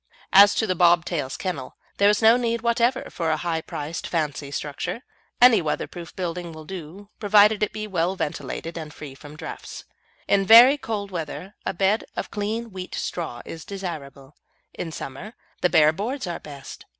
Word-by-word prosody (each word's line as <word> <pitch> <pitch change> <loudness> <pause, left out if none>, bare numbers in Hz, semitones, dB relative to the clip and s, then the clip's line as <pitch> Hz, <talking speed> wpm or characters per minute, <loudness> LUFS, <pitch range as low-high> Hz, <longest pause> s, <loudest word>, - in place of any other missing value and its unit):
As 200 +1 +8
to 220 - +1
the 185 - 0
bob 175 -1 +4
tail's 145 -6 -3
kennel, 165 -9 -5 0.2
there 200 0 +5
is 210 +2 +1
no 225 +1 +8
need 235 -1 -1
whatever 235 +2 +1
for 165 -3 -2
a 155 - +1
high 165 -1 -2
priced 155 +1 -5
fancy 150 -4 -2
structure. 145 - -4 0.4
Any 240 -5 +7
weatherproof 170 +2 -4
building 175 -2 -4
will 155 0 -10
do, 190 +3 -9
provided 210 0 +5
it 210 - +1
be 215 0 -5
well 185 -2 -1
ventilated 165 0 -4
and 155 -2 -7
free 145 -2 -9
from 145 +2 -12
draughts. - - -8 0.4
In 200 -1 +3
very 235 +7 +9
cold 205 -5 -4
weather 175 +3 -6
a - - -1
bed 195 +4 +2
of - - -4
clean 220 +2 -3
wheat 185 -1 -7
straw 160 -9 -4
is 165 -1 -8
desirable, 150 -8 -7 0.4
in 165 - -5
summer 160 - -8 0.3
the 180 - +3
bare 155 -2 +5
boards 240 - -3
are 175 -2 -4
best. 140 -2 -11
180 Hz, 175 wpm, -24 LUFS, 155-210 Hz, 0.4 s, very